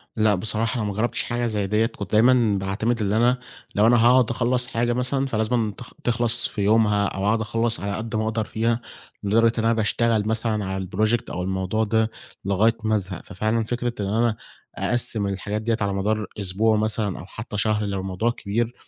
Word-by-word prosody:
لأ 110 -2 +3
بصراحة 110 +5 -1
أنا 105 - -1
ما - - -3
جربتش 110 +4 -1
حاجة 120 0 -1
زي 105 -3 -1
ديّة 105 +3 +2
كنت 105 -3 -6
دايمًا 115 -1 +4
باعتمد 100 +5 -1
اللي 105 +1 +1
أنا 120 +2 +3 0.4
لو 105 +2 +4
أنا 120 +1 +5
هاقعد 125 -1 +5
أخلَّص 125 +1 +1
حاجة 120 -1 0
مثلًا 130 +2 0
فلازمًا 110 -2 0
تخ 125 - -11
تخلص 120 0 +1
في 105 - -5
يومها 105 0 +3
أو 95 0 -3
أقعد 110 +2 +2
أخلَّص 115 +1 0
على 100 0 -3
قد 110 0 -4
ما 110 - +1
أقدر 110 0 -1
فيها، 115 +2 -1 0.4
لدرجة 115 +3 +3
إن - - 0
أنا 115 +1 +3
باشتغل 110 -1 +1
مثلًا 110 -2 0
على 95 0 -3
الproject 110 +5 +1
أو 90 - -3
الموضوع 95 +3 -1
ده 110 +1 +1 0.3
لغاية 105 +4 +2
ما 110 0 +2
أزهق، 95 -3 -2
ففعلًا 110 +4 -1
فكرة 120 +1 -2
إن 100 - -1
أنا 115 0 +2 0.4
أقسِّم 115 -3 0
الحاجات 100 +2 -3
دي 115 +1 +1
على 100 -1 0
مدار 105 +3 0 0.2
الأسبوع 105 +3 +1
مثلًا 105 -2 -1
أو 85 - -9
حتى 105 +2 -7
شهر 105 0 +1
لو 100 -1 -2
الموضوع 95 +4 -1
كبير 115 +2 -2
110 Hz, 195 wpm, -23 LUFS, 100-115 Hz, 0.4 s, أنا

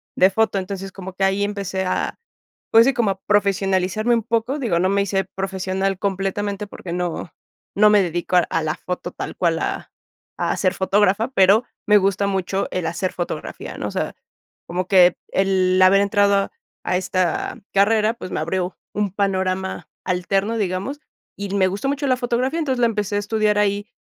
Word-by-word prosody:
de 185 - +5
foto. 210 0 +1
Entonces, 195 0 -5
como 190 -1 -8
que 195 - -3
ahí 195 +1 +2
empecé 195 -2 -2
a, 185 - -2 0.5
pues 225 +1 +7
sí, 270 - +3
como 235 -7 +1
a 190 0 -7
profesionalizarme 200 +2 +1
un 230 - -1
poco, 230 +5 -1
digo, 230 -11 0
no 185 +2 +2
me 200 +1 +2
hice 195 0 0
profesional 190 0 -2
completamente 200 +1 -2
porque 180 -3 -8
no 175 -1 -3 0.4
no 210 +1 +6
me 210 -2 +5
dedico 175 +1 -2
a - - +7
a 165 - 0
la 155 0 -1
foto 180 0 -5
tal - - -6
cual, 165 -2 +1
a - - -4 0.5
a - - -1
ser 185 -1 +1
fotógrafa, 200 +4 +2
pero 200 -1 +4 0.2
me 210 0 +7
gusta 200 0 +1
mucho 195 0 -1
el 180 -3 -2
hacer 170 +3 -2
fotografía, 175 - -5
¿no? - - -3
O - - -5
sea, - - -3 0.5
como 180 +1 -3
que 180 -2 +6 0.2
el 185 -1 +2
haber 190 +2 +6
entrado 200 -1 +2 0.3
a 180 - +1
esta 185 -2 -1
carrera, 215 +2 +3
pues 185 - -8
me - - -2
abrió 180 +3 -2 0.2
un 205 -1 -1
panorama 190 -3 -1 0.2
alterno, 195 +4 0
digamos, 200 +7 -2 0.4
y 200 -1 -5
me 190 -2 +3
gustó 200 +7 -3
mucho 285 0 -1
la 255 -1 +2
fotografía. 250 +4 -1
Entonces, 265 -6 -1
la 240 - +4
empecé 210 -2 -2
a - - +2
estudiar 210 0 +1
ahí 205 0 0
195 Hz, 180 wpm, -21 LUFS, 185-210 Hz, 0.5 s, pues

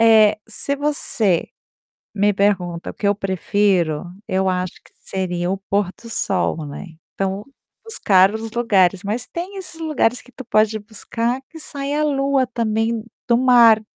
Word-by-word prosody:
eh, 220 -2 +6
se 225 +6 -2
você 275 - 0 0.7
me 205 0 +3
pergunta: 180 -4 0
"O - - -11
que 205 - 0
eu 205 - +3
prefiro?". 190 -4 +1 0.2
Eu 190 0 0
acho 180 -1 -1
que - - -23
seria 180 -2 -3
o 195 - 0
pôr 200 0 -1
do 230 - -10
sol, 190 -7 -1
né, 145 - -7 0.3
então, 195 +1 -2 0.4
buscar 195 - +3
os 220 0 -5
lugares 195 -6 +3
mas 220 +4 -3
tem 360 +4 -6
esses 360 -4 -8
lugares 275 -6 +1
que 250 - -18
tu 260 - -10
pode 215 0 +2
buscar 230 +3 -3
que 325 - -11
sai 285 -2 -4
a 305 +1 +1
lua 275 -2 +2
também 225 -1 -1 0.2
do 235 -1 +3
mar. 240 -4 +6
215 Hz, 160 wpm, -20 LUFS, 195-250 Hz, 0.7 s, eh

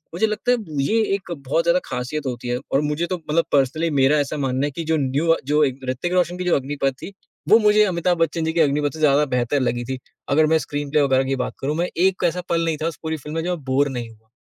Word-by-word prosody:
मुझे 220 +6 +2
लगता 215 +3 -1
है 250 - +3 0.3
ये 225 +10 +2
एक 190 -3 -8 0.2
बहुत 165 +5 +2
ज़्यादा 170 +2 +3
खासियत 130 +4 -4
होती 125 -1 -5
है 120 - 0 0.2
और 135 - +3
मुझे 150 +3 -1
तो 185 - -2
मतलब 165 +2 +2
पर्सनली 145 +4 +2
मेरा 135 +3 +4
ऐसा 145 +1 -2
मानना 135 -1 0
है - - -5
कि 165 +5 -5
जो 160 - +3
न्यू 145 +4 +2
जो 150 +1 +3
एक 135 -1 -3
ऋतिक 140 +8 -2
रोशन 180 -1 +1
की 180 - -3
जो 180 - +3
अग्निपथ 140 0 -1
थी, 200 - -7 0.4
वो 220 - +8
मुझे 210 -1 +5
अमिताभ 175 -2 0
बच्चन 165 0 0
जी 160 - -1
की 170 - 0
अग्निपथ 145 -1 +1
से 160 - -8
ज़्यादा 150 -1 +4
बेहतर 125 +4 0
लगी 120 -1 -1
थी। 130 +1 -4 0.3
अगर 155 +2 +4
मैं - - +6
स्क्रीनप्ले 145 +1 0
वगैरह 135 -2 +3
की 135 - +1
बात - - -6
करूँ 145 +2 -1
मैं 175 +1 0 0.2
एक 190 -1 -2
ऐसा 175 +2 -2
पल 165 0 +1
नहीं 160 -2 -1
था - - +1
उस 165 - -5
पूरी 160 0 -2
फ़िल्म 150 +1 -8
में 165 - -1
जब 175 - -2
मैं 175 -5 -3
बोर 135 +2 +2
नहीं 120 -3 -5
हुआ। 110 0 -20
150 Hz, 265 wpm, -22 LUFS, 135-170 Hz, 0.4 s, वो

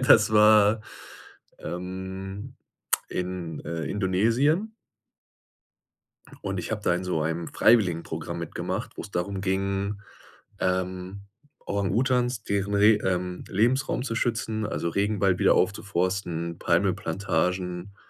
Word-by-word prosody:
das 110 -4 +6
war, 105 0 +6 0.8
ähm, 95 +2 -6 0.5
in, 90 -3 -4
äh, 85 -1 -3
Indonesien. 115 - +1 1.7
Und 95 -1 -2
ich 90 - -4
habe 110 -1 -2
da 90 - +2
in 90 +1 -3
so 90 -4 0
einem 80 +1 -2
Freiwilligenprogramm 85 -6 +2
mitgemacht, 85 -2 -4
wo - - -2
es - - -8
darum 95 +2 -2
ging, 100 +1 -1 0.6
ähm, 95 +1 -2 0.4
Orang-Utans 120 +3 0
deren 100 0 -1
Re 105 +2 +6
ähm, 90 -1 -2
Lebensraum 120 +6 +1
zu 120 -4 -3
schützen, 115 -2 -1
also, 85 -4 -2
Regenwald 100 -1 +1
wieder - - +5
aufzuforsten, 90 -3 -1
Palmölplantagen, 90 0 0
95 Hz, 105 wpm, -26 LUFS, 90-105 Hz, 1.7 s, das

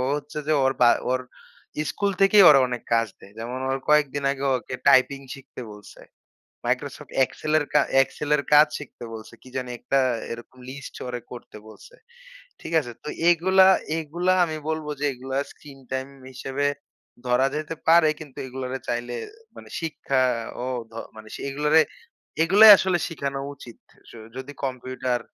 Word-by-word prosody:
হচ্ছে 150 +1 -7
যে 155 - +3
ওর 135 - +3
বা 120 - +7 0.2
ওর 130 - +1 0.6
ইস্কুল 200 +5 -1
থেকেই 195 +1 +7
ওর 150 - +8
অনেক 125 -1 -4
কাজ 115 0 +2
দেয়। 100 - -16
যেমন 125 +3 -5
ওর 135 - 0
কয়েকদিন 145 -2 +2
আগে, 140 0 -5
ওকে 130 +1 -5
টাইপিং 135 +1 +5
শিখতে 135 -1 -11
বলসে। 105 -1 -14 0.7
Microsoft - - -3
Excel 155 +4 -3
এর 150 - -3
কা 150 - +5 0.2
Excel 145 +2 -4
এর 145 - -2
কাজ 150 +1 +8
শিখতে 145 -4 -11
বলসে। 110 -1 -10
কি 130 - -14
জানি? 125 -1 -3
একটা 135 - +1 0.3
এরকম 120 +2 -9
লিস্ট 140 0 -9
ও - - -5 0.2
করতে 120 -3 -10
বলসে। 480 - -15 0.7
ঠিক 160 - -8
আসে? 120 -5 -8
তো - - -7 0.2
এগুলা, 185 +2 +5 0.3
এগুলা 170 +4 0
আমি 155 -2 -4
বলব 160 -1 -2
যে, - - -2
এগুলা 130 +1 -6 0.2
স্ক্রিন 140 -2 -15
টাইম 130 +1 -2 0.2
হিসেবে 135 +2 -2 0.6
ধরা 125 +2 +3
যেতে 155 +1 -4
পারে। 165 -1 +6
কিন্তু 145 -5 -12
এগলারে 130 0 -5
চাইলে 120 0 -2 0.4
মানে - - -12
শিক্ষা 140 -5 -1 0.4
ও - - -3 0.2
ধ - - -24 0.2
মানে 110 0 -11 0.2
এগুলোরে, 150 +3 +3 0.6
এগুলোই 205 +6 +8
আসলে 185 -2 +1
শিখানো 140 -4 -4 0.2
উচিত। 120 -3 -13 0.2
আস - - -18 0.2
যদি 130 +2 -7
কম্পিউটার 130 -1 -3
135 Hz, 160 wpm, -24 LUFS, 125-155 Hz, 0.7 s, ওর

